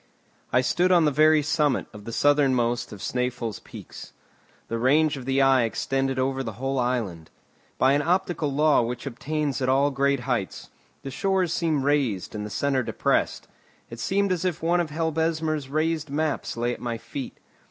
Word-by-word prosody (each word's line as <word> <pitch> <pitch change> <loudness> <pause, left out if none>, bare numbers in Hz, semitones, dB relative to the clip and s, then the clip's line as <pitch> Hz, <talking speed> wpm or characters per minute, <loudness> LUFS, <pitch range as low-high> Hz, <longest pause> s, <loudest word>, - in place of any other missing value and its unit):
I 125 - +4
stood 180 +8 +1
on 175 -3 +5
the 150 - +3
very 155 +1 +4
summit 150 -2 +1
of 105 -1 -11
the 115 - -6
southernmost 130 -3 +2
of 100 - -9
Snæfell's 125 -3 -2
peaks. - - -11 0.5
The 115 - -3
range 145 +5 +3
of 130 -3 -8
the 135 +1 +2
eye 135 -1 +5
extended 135 +3 -1
over 135 +1 0
the 115 -4 -5
whole 135 +4 -2
island. 110 -10 -2 0.5
By 130 +1 +4
an 145 - +2
optical 170 -2 0
law 150 0 +3
which 120 +2 -4
obtains 140 +2 -3
at 130 - +1
all 140 +2 +3
great 140 -1 +1
heights, 120 -6 -3 0.3
the 135 - -6
shores 185 +3 0
seemed 160 -5 0
raised 135 -10 0
and 105 -1 -4
the 105 - -5
centre 135 +4 0
depressed. - - -1 0.4
It 115 - -8
seemed 200 +8 0
as 180 -1 -1
if 180 -4 -2
one 175 +2 +2
of 170 -2 -1
Helbesmer's 160 -2 -1
raised 155 +1 -1
maps 150 -3 -2
lay 120 +1 0
at - - -10
my 120 -1 -3
feet. 135 +3 -7
140 Hz, 180 wpm, -25 LUFS, 125-155 Hz, 0.5 s, on